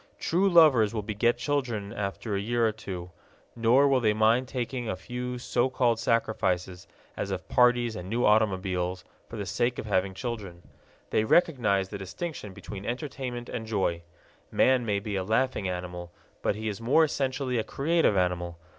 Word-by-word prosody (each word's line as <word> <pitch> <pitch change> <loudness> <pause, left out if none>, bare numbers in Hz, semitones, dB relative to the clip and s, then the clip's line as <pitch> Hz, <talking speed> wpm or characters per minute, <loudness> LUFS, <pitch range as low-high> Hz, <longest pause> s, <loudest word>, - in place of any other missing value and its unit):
True 190 +4 +2
lovers 140 - +5
will 105 - -2
beget 115 +3 +1
children 120 -6 -2
after 105 0 -3
a - - 0
year 115 +2 +1
or - - +1
two, 95 -5 -7 0.4
nor 120 +4 +4
will 135 -2 +3
they 110 -3 +2
mind 115 +4 +2
making 120 -1 -3
a - - -1
few 125 +5 -5
so 120 +1 0
called 120 -3 +1
sacrifices, 95 -6 -1 0.3
as - - -3
of - - -4
parties 120 -2 +3
and 90 0 -7
new 120 +3 +1
automobiles, 95 -4 +1 0.3
for - - -8
the 105 -2 -4
sake 120 +6 0
of - - -5
having 95 -2 0
children. 100 -7 -6 0.5
They 110 - +2
recognize 110 - +2
the 100 - -6
distinction 105 - -6
between 95 +1 -8
entertainment 125 -2 -4
and 110 -2 -5
joy. 95 -6 0 0.5
Man 130 -2 +3
may 100 -1 +1
be 100 0 -4
a 95 - -1
laughing 110 -1 0
animal, 90 -1 -5 0.3
but - - 0
he 110 +1 -4
is 105 +1 -4
more 135 +8 +4
essentially 135 -4 -1
a - - 0
creative 155 - +1
animal. 90 -2 -1
110 Hz, 175 wpm, -28 LUFS, 95-125 Hz, 0.5 s, lovers